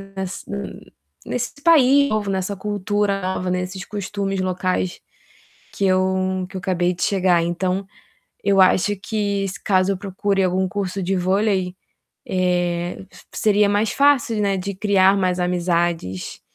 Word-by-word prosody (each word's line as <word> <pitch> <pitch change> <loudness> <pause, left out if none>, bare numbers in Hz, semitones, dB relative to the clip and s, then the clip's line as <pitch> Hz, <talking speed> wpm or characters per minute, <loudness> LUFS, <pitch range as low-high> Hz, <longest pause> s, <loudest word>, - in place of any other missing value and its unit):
nessa 190 -1 -6
n 65 - -7 0.3
nesse 245 -1 -3
país 280 -3 +5
novo, 210 -2 -1
nessa 190 +1 -2
cultura 205 0 -1
nova, 185 0 -2
nesses 185 +1 -3
costumes 200 -1 -3
locais 185 0 -1 0.7
que 200 - -1
eu 185 0 +1
que - - -13
eu - - -3
acabei 180 -1 0
de 175 - -4
chegar. 180 -4 +2
Então 185 +3 -1 0.6
eu 195 -1 +4
acho 190 +2 +4
que 200 -1 -2
se 195 - -8
caso 190 0 +2
eu - - -2
procure 195 0 -1
algum 185 +1 +1
curso 195 -1 -3
de 190 +2 0
vôlei, 185 0 0 0.5
eh, 175 -1 -1
se - - -17 0.2
seria 210 -1 +4
mais 205 +2 +1
fácil, 275 -6 +3
né, 195 -1 +1
de 195 +1 -4
criar 195 -1 +3
mais 185 -1 0
amizades. 175 - -1
190 Hz, 145 wpm, -21 LUFS, 180-200 Hz, 0.7 s, país